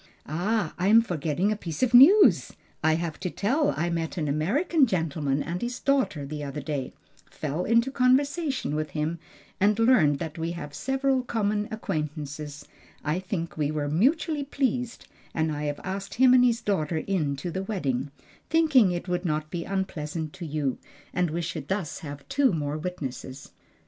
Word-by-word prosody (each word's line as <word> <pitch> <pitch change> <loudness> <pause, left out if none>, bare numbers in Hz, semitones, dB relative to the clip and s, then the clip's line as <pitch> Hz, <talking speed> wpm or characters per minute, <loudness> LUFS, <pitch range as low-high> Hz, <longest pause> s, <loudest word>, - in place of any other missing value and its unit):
"Ah, 175 +4 -1
I 185 - +1
am 225 +2 +7
forgetting 175 +1 -1
a - - +1
piece 170 - -4
of 250 -1 +1
news 325 - +7 0.3
I 160 0 +4
have 165 -1 -3
to 180 - -2
tell 270 - +1
I 170 +2 0
met 165 +1 -3
an 155 -3 -1
American 255 - +2
gentleman 155 -7 -1
and 175 +1 -4
his 240 +1 -3
daughter, 265 - +1
the 150 +1 -5
other 145 +1 -5
day, 140 -2 -3 0.4
fell 155 +3 -3
into 230 +4 +3
conversation 275 - +1
with 155 0 -2
him, 160 +3 -1 0.4
and 205 +1 +3
learned 225 - +4
that 160 +1 -6
we 165 +1 -2
have 150 -4 -7
several 270 - 0
common 210 -4 -1
acquaintances 150 -7 -5 0.4
I 155 +4 0
think 180 -4 -4
we 150 -2 0
were 150 -1 -2
mutually 285 - +1
pleased, 250 -3 -2 0.3
and 160 -1 +1
I 150 0 -3
have 145 -1 -3
asked 195 +1 -5
him 255 +1 +6
and 250 -1 +6
his 235 -1 +2
daughter 165 -5 0
in 155 -5 -1
to 170 +5 -5
the 190 - -3
wedding; 145 - -2 0.4
thinking 305 - +5
it 175 +1 -3
would 180 0 -1
not 155 -3 -2
be 170 -2 -3
unpleasant 165 -5 -3
to 180 -3 -7
you, 145 -3 -2 0.3
and 180 -2 +1
we 170 +2 -2
should 155 -3 -5
thus 190 -5 -2
have 145 -2 -9
two 270 -1 +3
more 145 -2 -2
witnesses." 140 -5 -6
175 Hz, 175 wpm, -26 LUFS, 150-230 Hz, 0.4 s, am